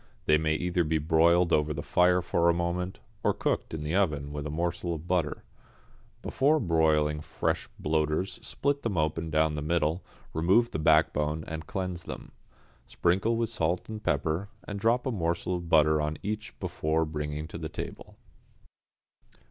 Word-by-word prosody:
They 75 0 +4
may 80 0 +1
either 90 +1 0
be 80 0 +1
broiled 85 +3 +3
over 75 0 +2
the 75 - -4
fire 90 0 +3
for 85 -1 +2
a 85 - +3
moment, 90 +2 -2 0.2
or - - +2
cooked - - -1
in 75 - -5
the 75 +2 -2
oven 75 -7 0
with 75 0 -4
a - - -5
morsel 85 +2 -2
of 80 +1 -8
butter. 85 -5 0 0.8
Before 150 +4 +2
broiling 80 - +2
fresh - - -2
bloaters 75 +4 0
split 140 0 -1
them 105 -6 -2
open 80 +1 0
down 80 0 +2
the 75 - -3
middle, 80 +2 0 0.3
remove 95 +9 +3
the - - -3
backbone 75 0 +2
and 80 -1 -6
cleanse 90 -3 -4
them. - - -8 0.6
Sprinkle 95 +7 +1
with 115 -1 0
pepper 80 - 0
and 110 +3 -9
salt, 80 +7 0
and 100 -1 -5
drop 115 +4 +2
a 130 - 0
morsel 85 -2 -1
of 85 -1 -8
butter 75 -1 +4
on 75 0 -2
each 105 +1 -4
before 80 +1 0
bringing 75 0 -4
to - - -7
table. - - -7
80 Hz, 165 wpm, -28 LUFS, 75-90 Hz, 0.8 s, They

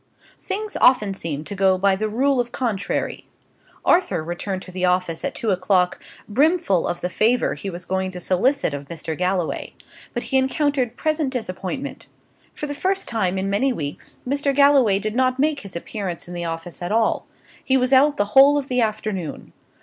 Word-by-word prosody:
Things 420 +2 -4
often 215 -6 +4
seem 155 -6 -4
to 180 - -7
go 190 -1 +3
by 195 +1 +3
the 215 +2 -2
rule 265 +4 +2
of 240 -1 -1
contrary. 220 -6 -2 0.6
Arthur 200 - +3
returned 185 +3 -4
to 185 - -11
the 185 0 -4
office 180 -2 +1
at 280 - -3
two 225 -4 -1
o'clock, 185 -1 +1 0.3
brimful 275 - +2
of 175 - -3
the - - 0
favour 225 +7 +2
he 200 - -5
was 175 -1 -6
going 190 0 -1
to 180 -1 -7
solicit 190 - +1
of 140 0 -6
Mr. 160 0 -5
Galloway; 180 0 -2 0.4
but 240 - -2
he 265 - +1
encountered 265 -2 0
present 310 -2 0
disappointment. 250 +3 -5 0.5
For - - -4
the 290 - -4
first 380 +6 -1
time 190 -5 0
for 190 - -1
many 200 +8 +1
weeks, 145 - -5
Mr. 280 +1 0
Galloway 275 -8 +5
did 215 +2 -2
not 255 0 +2
make 295 +1 +1
his 195 -6 -8
appearance 180 -1 -5
in 175 - -8
the 175 -1 -4
office 165 +1 -6
at 175 - -3
all; 225 0 +1 0.4
he 265 - +3
was 255 +1 +1
out 285 +2 +5
the 205 - +2
whole 280 +2 +7
of 280 -1 -3
the 250 -1 +2
afternoon. 215 -7 -3
215 Hz, 190 wpm, -22 LUFS, 180-270 Hz, 0.6 s, whole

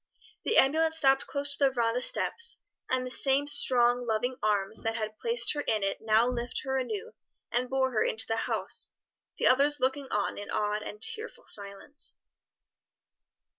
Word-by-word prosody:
The 450 - +1
ambulance 320 +4 +3
stopped 270 -3 +2
close 285 0 -3
to - - -15
the - - +4
veranda 240 -1 -1
steps, 465 - +1 0.3
and 255 0 0
the 255 - -6
same 270 +3 +3
strong, 245 -3 +3
loving 235 +3 -1
arms 210 0 -1
that 225 0 -2
had 215 -1 -4
placed 470 +1 +2
her 295 - -3
in 215 -7 -1
it 195 - -2
now 220 +2 +3
lifted 245 -1 -4
her 265 0 -2
anew 220 -5 -5 0.4
and 250 +1 -1
bore 265 -1 0
her 220 - +1
into 220 - +2
the 225 - -2
house, - - +1 0.4
the - - -1
others 280 +3 +4
looking 265 +2 -1
on 205 -1 -2
in 205 - -8
awed 210 0 -1
and 210 0 -3
tearful 445 0 -1
silence. 200 +8 -4
250 Hz, 170 wpm, -28 LUFS, 220-275 Hz, 0.4 s, the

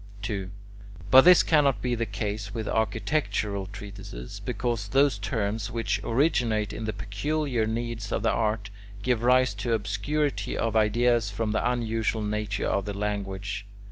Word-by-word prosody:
2. 100 -2 -3 0.6
But 130 +1 +9
this 180 -1 +8
cannot 145 -4 +3
be 125 -1 -1
the 115 -1 -1
case 100 +1 -4
with 110 -2 -3
architectural 105 -2 -1
treatises, 100 -11 -9
because 120 -5 -2
those 135 -1 +3
terms 105 0 -2
which 115 -1 -1
originate 115 -5 +1
in 110 - -5
the 110 - -1
peculiar 120 +4 -1
needs 115 -1 -3
of - - -1
the - - +3
art, 105 -2 -1 0.3
give 125 -3 +1
rise 125 -1 +4
to 105 +4 -2
obscurity 125 +8 -1
of 115 -1 -1
ideas 115 +1 +3
from 105 +2 -2
the 115 +3 +1
unusual 115 -2 -1
nature 105 0 -2
of 100 -1 0
the 100 -1 -4
language. 100 0 -3
110 Hz, 150 wpm, -27 LUFS, 100-120 Hz, 0.6 s, But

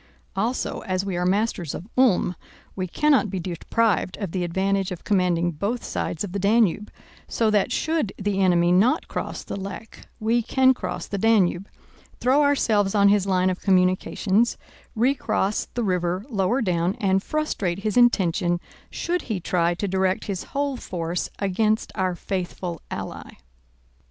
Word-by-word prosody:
Also, 225 +6 -1
as 185 0 -1
we 195 -2 -2
are 180 0 0
masters 195 -5 0
of 180 - -8
Ulm, 230 -8 +3 0.4
we 185 -1 -2
cannot 275 - +2
be 190 0 -3
deprived 185 +3 0
of 195 -6 -4
the 185 0 -1
advantage 190 +2 0
of 180 - -6
commanding 175 -3 +1
both 205 +10 -3
sides 165 - -3
of 200 - -5
the 200 - -3
Danube, 210 0 +2 0.4
so 225 -2 +1
that 205 -2 +2
should 315 -10 0
the 200 -1 -1
enemy 175 -2 +3
not 230 - +3
cross - - -4
the - - -6
Lech, 200 +3 -8
we 230 +2 +2
can 260 +3 +3
cross - - -5
the 200 - -4
Danube, 200 -3 +2 0.5
throw 260 +4 +3
ourselves 220 -9 +2
on 200 -1 +5
his 200 -1 +2
line 185 -1 +2
of 185 - -5
communications, 190 +3 +2 0.4
recross 220 -4 +1
the 240 - 0
river 180 0 -1
lower 220 +4 +1
down, 180 0 0
and 195 -5 +1
frustrate 205 - -2
his 215 -1 -1
intention 185 -7 +3 0.3
should 355 0 -2
he 210 -4 -1
try 175 0 +1
to 200 - -3
direct 190 0 0
his 195 -3 -4
whole 280 -1 -2
force 170 -4 -3
against 215 +3 0
our 185 -1 -1
faithful 180 -2 -4
ally. - - -6
195 Hz, 155 wpm, -24 LUFS, 180-225 Hz, 0.5 s, on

